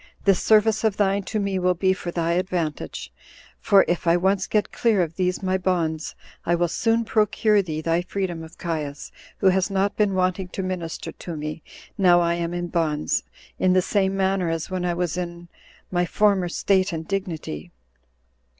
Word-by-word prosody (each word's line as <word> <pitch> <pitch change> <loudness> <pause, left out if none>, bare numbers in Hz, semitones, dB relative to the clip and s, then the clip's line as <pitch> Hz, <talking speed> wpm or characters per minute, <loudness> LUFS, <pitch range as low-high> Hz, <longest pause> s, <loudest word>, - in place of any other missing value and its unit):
this 195 -2 +4
service 220 0 +4
of 215 -3 +1
thine 200 -1 +2
to 215 +3 -3
me 200 -2 -1
will 180 0 +2
be 190 +2 +2
for 180 -1 -6
thy 170 -1 -1
advantage; 165 - -2 0.5
for 195 -1 +5
if 175 0 -1
I 170 +1 +5
once 190 +1 +1
get 210 -1 0
clear 215 -6 +2
of 165 -1 -5
these 180 +1 -1
my 190 0 +1
bonds, 165 -4 -1 0.3
I 170 - +2
will 175 0 +1
soon 225 +5 +1
procure 210 -1 +2
thee 155 -4 -4
thy 165 +2 +1
freedom 180 -2 -3
of 160 +1 -11
Caius 150 -4 -4 0.3
who 195 - +4
has 190 +1 +1
not 195 +1 0
been 205 -3 +1
wanting 185 0 0
to 190 +1 -5
minister 180 -3 -4
to 170 -3 -7
me 155 +2 -5 0.4
now 175 -2 +6
I 170 0 +2
am 170 0 -2
in 175 0 -3
bonds, 155 -3 0 0.4
in 185 -1 +3
the 185 - +4
same 195 -1 +1
manner 190 -2 +1
as 165 +2 -3
when 185 -1 -2
I 175 -1 0
was 175 -1 -2
in 170 -1 -5 0.4
my 175 -1 +1
former 200 -3 +2
state 190 +2 +1
and 160 -1 -5
dignity." 170 - -4
180 Hz, 185 wpm, -24 LUFS, 170-195 Hz, 0.5 s, now